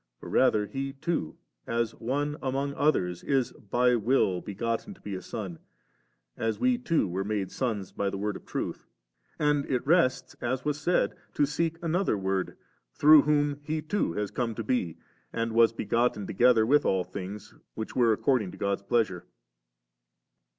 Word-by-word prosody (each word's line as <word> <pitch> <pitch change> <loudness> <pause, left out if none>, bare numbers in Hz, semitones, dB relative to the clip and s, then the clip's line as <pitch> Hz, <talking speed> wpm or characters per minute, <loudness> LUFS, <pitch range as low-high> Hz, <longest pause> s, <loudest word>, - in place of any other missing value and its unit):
For - - -9
rather 105 -1 +3
He 135 +6 -4
too, 135 - -3 0.3
as 115 -1 0
one 145 +5 -1
among 140 +1 -1
others 90 - +1
is 135 -3 +1
by 125 +4 +1
will 110 -5 +2
begotten 115 - -3
to - - -23
be 100 - -6
a 95 - -4
Son, 95 -7 -6 0.8
as 115 0 -2
we 255 -1 +2
too 165 - +1
were 95 +2 -2
made 100 -2 -2
sons 110 -7 -2
by 100 - -1
the 100 - -4
Word 105 0 -2
of - - -9
Truth; - - -4 0.5
and 150 -1 +2
it 125 -1 0
rests, 155 -4 +2
as 130 +3 -2
was 150 0 -1
said, 175 +3 +2 0.2
to 145 - +4
seek 165 +3 -1
another 170 - +1
Word, 95 -1 -2 0.4
through 150 0 +8
whom 145 -1 +1
He 155 +2 -2
too 175 - -1
has 105 +1 -2
come 115 -3 -2
to 115 - -4
be, 95 -9 -1 0.3
and 115 0 -2
was 115 0 +5
begotten 115 -1 0
together 115 +3 +4
with 145 +5 +4
all 95 -1 +1
things, 100 +2 -7 0.2
which 110 - -5
were 120 -2 +4
according 110 -2 +1
to - - -10
God's 100 0 -1
pleasure. 100 -5 0
120 Hz, 170 wpm, -28 LUFS, 100-145 Hz, 0.8 s, through